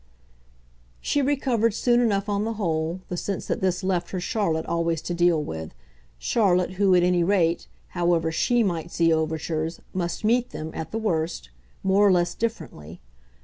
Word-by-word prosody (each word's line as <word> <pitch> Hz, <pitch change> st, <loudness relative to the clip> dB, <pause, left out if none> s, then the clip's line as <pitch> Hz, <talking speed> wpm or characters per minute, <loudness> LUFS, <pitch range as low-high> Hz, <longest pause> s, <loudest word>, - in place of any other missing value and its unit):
She 290 Hz, -, 0 dB
recovered 255 Hz, -6 st, +1 dB
soon 240 Hz, 0 st, +3 dB
enough 205 Hz, -4 st, +1 dB
on 205 Hz, 0 st, 0 dB
the 225 Hz, +1 st, -2 dB
whole, 170 Hz, -3 st, -2 dB
the 180 Hz, -, -3 dB
sense 195 Hz, +2 st, -3 dB
that -, -, -2 dB
this 185 Hz, 0 st, 0 dB
left 180 Hz, -2 st, -1 dB
her 185 Hz, -, -3 dB
Charlotte 175 Hz, -5 st, -1 dB
always 170 Hz, -1 st, 0 dB
to 175 Hz, -, -3 dB
deal 175 Hz, -1 st, +3 dB
with 80 Hz, -, -7 dB, 0.4 s
Charlotte 180 Hz, -, +2 dB
who, 190 Hz, -1 st, +3 dB
at 175 Hz, -, +4 dB
any 180 Hz, -1 st, +3 dB
rate, 175 Hz, -3 st, +1 dB, 0.2 s
however 170 Hz, -2 st, +1 dB
SHE 240 Hz, +8 st, +2 dB
might 170 Hz, -4 st, -3 dB
meet 165 Hz, -1 st, +4 dB
overtures, 160 Hz, +1 st, -2 dB
must 175 Hz, 0 st, -3 dB
meet 245 Hz, +3 st, +2 dB
them, 155 Hz, +1 st, -6 dB
at 160 Hz, -, -5 dB
the 225 Hz, -, -4 dB
worst, 165 Hz, -, -2 dB, 0.3 s
more 195 Hz, +2 st, +4 dB
or -, -, +5 dB
less 175 Hz, -1 st, +2 dB
differently. 85 Hz, -, -5 dB
180 Hz, 170 wpm, -25 LUFS, 165-205 Hz, 0.4 s, or